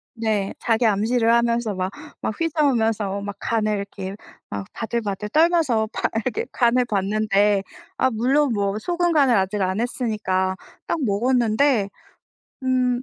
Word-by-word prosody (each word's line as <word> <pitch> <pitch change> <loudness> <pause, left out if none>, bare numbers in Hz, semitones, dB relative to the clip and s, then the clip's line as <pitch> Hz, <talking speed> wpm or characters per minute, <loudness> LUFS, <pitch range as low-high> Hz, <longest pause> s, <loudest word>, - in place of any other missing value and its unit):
네. 215 -4 -1
자기 230 +1 +1
암시를 225 +3 +2
하면서 235 -2 +1
막 185 +1 -2 0.3
막 - - -2
휘저으면서 225 - +1
막 200 0 -5
간을 215 -2 0
이렇게 200 -1 -6 0.3
막 100 -1 -5
바들바들 210 -3 -3
떨면서 310 -7 +3
봐야겠 225 +1 -2
간을 245 0 +2
봤는데 205 -1 +1 0.3
아 260 - +3
물론 260 +5 +2
뭐 200 -1 -1
소금 350 +6 0
간을 275 -6 +4
아직 195 +1 0
안 190 +2 0
했으니까 210 -6 -1 0.3
딱 - - 0
먹었는데 235 +1 +2 0.8
음 250 -1 +1
225 Hz, 270 characters per minute, -22 LUFS, 200-250 Hz, 0.8 s, 간을